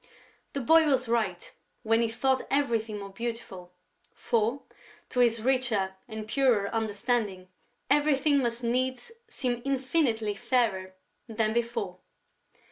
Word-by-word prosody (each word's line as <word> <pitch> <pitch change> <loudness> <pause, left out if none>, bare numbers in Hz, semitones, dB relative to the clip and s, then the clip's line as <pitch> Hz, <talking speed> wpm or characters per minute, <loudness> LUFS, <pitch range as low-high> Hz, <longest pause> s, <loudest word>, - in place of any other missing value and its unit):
The 280 - -2
boy 320 +5 +5
was 260 -3 +2
right, 215 -7 -1 0.3
when 225 +1 +3
he 230 - +1
thought 260 +3 0
everything 230 -6 0
more 200 -1 -8
beautiful, 225 -5 -6 0.4
for, 230 +4 0 0.5
to 250 - -2
his 230 -2 +3
richer 240 -7 +1
and 220 -2 -7
purer 230 -5 +2
understanding, 215 -3 -1 0.4
everything 290 0 +3
must 240 -1 -1
needs 255 - -1 0.2
seem 250 - -2
infinitely 260 -5 0
fairer 195 -5 0 0.3
than 220 -1 0
before. 230 -6 -2
235 Hz, 120 wpm, -28 LUFS, 215-260 Hz, 0.5 s, boy